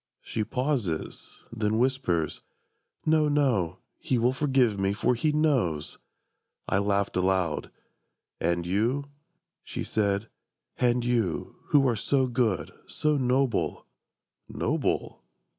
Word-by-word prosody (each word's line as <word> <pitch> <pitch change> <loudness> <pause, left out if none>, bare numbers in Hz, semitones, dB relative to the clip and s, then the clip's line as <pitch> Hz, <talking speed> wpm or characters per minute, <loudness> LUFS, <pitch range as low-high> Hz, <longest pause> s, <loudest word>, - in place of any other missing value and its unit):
She 110 - -2
pauses: 125 - -3
then 110 -1 0
whispers: 115 - 0 0.6
"No, 155 -1 +4
no, 120 - +1 0.2
He 130 - 0
will 120 +2 +2
forgive 130 -6 +2
me, 95 0 +1
for 115 +4 +1
He 150 +6 +1
knows!" 130 - 0 0.7
I 95 - +2
laughed 100 0 0
aloud: 90 -3 +1 0.7
"And 85 +1 0
you," 115 +10 0 0.6
she - - -5
said, 100 0 0 0.5
"and 120 -1 +2
you, 115 -8 -1
Who 140 -2 +4
are 120 - +2
so 130 +5 +1
good, 120 -6 0
so 150 0 0
noble"... 130 -2 +1 0.6
"Noble? - - -1
115 Hz, 110 wpm, -27 LUFS, 100-135 Hz, 0.7 s, No